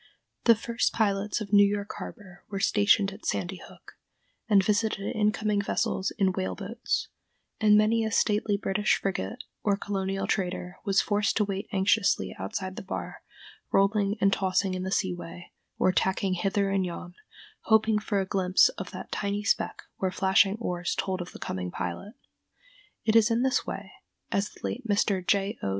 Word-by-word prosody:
The 230 - +7
first 230 +2 -1
pilots 205 0 0
of 205 -1 -6
New 205 0 +8
York 205 0 -1
harbor 185 -4 -10
were 200 -2 -3
stationed 205 0 +3
at 205 - -13
Sandy 185 +1 -2
Hook, - - -16 0.5
and 200 -2 +5
visited 210 0 0
incoming 210 -1 +1
vessels 195 -1 -1
in 195 -3 +3
whale 95 - -2
boats; - - -3 0.5
and 210 -1 +6
many 220 +2 +3
a 220 - 0
stately 210 -1 +1
British 205 +1 +1
frigate 100 - -3 0.2
or 200 -1 +1
colonial 195 -1 -2
trader 180 -2 -2
was 195 -1 +3
forced 205 0 0
to 215 - +3
wait 195 +1 -4
anxiously 190 - +2
outside 185 - -4
the - - -4
bar, 190 - -6 0.5
rolling 200 +1 +2
and 195 0 +3
tossing 190 0 +1
in 185 - -3
the 190 - -3
sea 185 -2 +1
way, 175 0 -9 0.3
or 185 - +3
tacking 190 +1 +1
hither 195 +2 0
and 195 -1 +1
yon, 175 0 -6 0.5
hoping 220 -1 +4
for 205 -1 -1
a 190 - 0
glimpse 190 - +4
of - - -5
that - - -9
tiny 205 0 -2
speck - - 0
where 190 - 0
flashing 195 +1 +3
oars 175 -6 -2
told 185 -1 -2
of 175 - -7
the - - -10
coming 90 -1 -4
pilot. 90 - -5 0.9
It 220 0 +2
is 225 0 +6
in 230 +2 +1
this 260 -1 +1
way, - - -6 0.4
as 200 +1 0
the - - -18
late 245 0 -4
Mr. 200 -2 +1
J. 200 +3 0
O. - - -2
200 Hz, 175 wpm, -27 LUFS, 190-210 Hz, 0.9 s, New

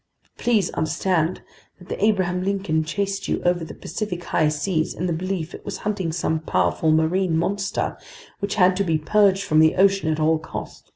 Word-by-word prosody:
But - - -17
please 220 -7 +2
understand 165 +2 0 0.3
that 180 - -16
the - - -3
Abraham 185 -4 +2
Lincoln 195 -5 0
chased 195 +4 -2
you - - 0
over 175 -1 +1
the 160 - -8
Pacific 180 0 -5
high 155 -2 +1
seas 160 +2 -1
in 180 - -3
the 175 - 0
belief 175 -1 -3
it - - -9
was 200 -2 -5
hunting 195 -5 -1
some 160 -1 -1
powerful 160 0 +1
marine 160 +2 +2
monster, 195 +4 -1 0.4
which 200 0 -2
had 185 -3 +4
to 200 - +2
be 165 -4 +1
purged 195 +4 +3
from 155 - +2
the 160 0 +5
ocean 195 -3 +3
at 155 - -1
all 155 +1 +3
cost." 155 - -8
180 Hz, 190 wpm, -23 LUFS, 160-195 Hz, 0.4 s, the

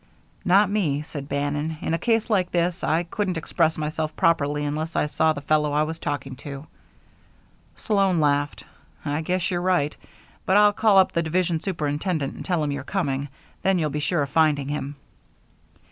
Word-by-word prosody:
"Not 195 +3 +5
me," 155 -9 0
said 145 -2 -8
Bannon. 145 +2 -2
"In 160 - -2
a 165 - 0
case 225 -2 +1
like 195 -6 +1
this 175 0 0
I 165 +2 +2
couldn't 185 +1 -2
express 160 0 0
myself 155 0 -3
properly 150 -3 +1
unless 155 +3 -3
I - - +2
saw 160 +1 +2
the 145 - -4
fellow 150 0 +1
I 150 +1 +3
was 160 +1 -4
talking 140 -2 -4
to." 140 +1 -8 1.1
Sloan 195 -5 +1
laughed. 145 -1 +1 0.4
"I 145 +1 -1
guess 180 +3 -1
you're 175 -1 -1
right. 175 -5 +1 0.5
But 190 - +3
I'll 210 0 +6
call 210 -1 +4
up 190 - +5
the 170 - +1
division 170 0 0
superintendent 155 -3 -2
and - - -8
tell 175 -4 0
him 145 - -1
you're 140 -1 -4
coming. 140 -5 -2 0.3
Then 190 -1 +2
you'll 155 -4 0
be 150 - -2
sure 150 +1 +1
of 140 - -6
finding 150 -4 +2
him." 145 -1 -4
155 Hz, 180 wpm, -24 LUFS, 145-180 Hz, 1.1 s, I'll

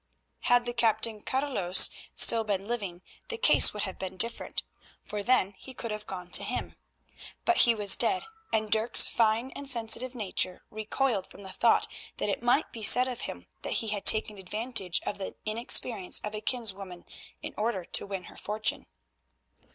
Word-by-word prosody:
Had 245 0 +3
the 240 - -3
Captain 225 -2 +1
Carolus 255 -10 +2 0.2
still 230 -1 +5
been 200 -2 -2
living 200 -7 -4 0.3
the 465 - -3
case - - +5
would 210 - -3
have 190 - -5
been 190 0 -6
different, 230 +4 -1 0.4
for 210 -1 -5
then 205 -3 +2
he 265 - -10
could 230 -2 -4
have 210 0 -6
gone 180 -2 -7
to - - +4
him. - - -4 0.7
But 355 -1 +3
he 235 -1 +6
was 205 -2 +5
dead, 375 - +1 0.3
and 215 -1 0
Dirk's 220 +1 +4
fine 230 +3 +1
and 280 - -7
sensitive 245 +1 +1
nature 190 -4 -1
recoiled 215 -1 -1
from 200 - -13
the 190 - -8
thought 230 - +3 0.3
that - - -2
it 200 - -2
might 245 +6 +1
be 225 - -8
said 250 +4 +5
of 250 -2 -5
him 85 0 -7 0.2
that - - -3
he 225 - 0
had 205 -1 -3
taken 215 -2 +3
advantage 210 -1 -1
of 205 - -4
the 190 - -6
inexperience 215 -2 +1
of 210 - -5
a 215 - -5
kinswoman 200 -7 -3 0.4
in - - -6
order 210 -4 -2
to - - 0
win 195 -2 -5
her - - -13
fortune. 215 +1 -1
215 Hz, 180 wpm, -28 LUFS, 195-240 Hz, 0.7 s, he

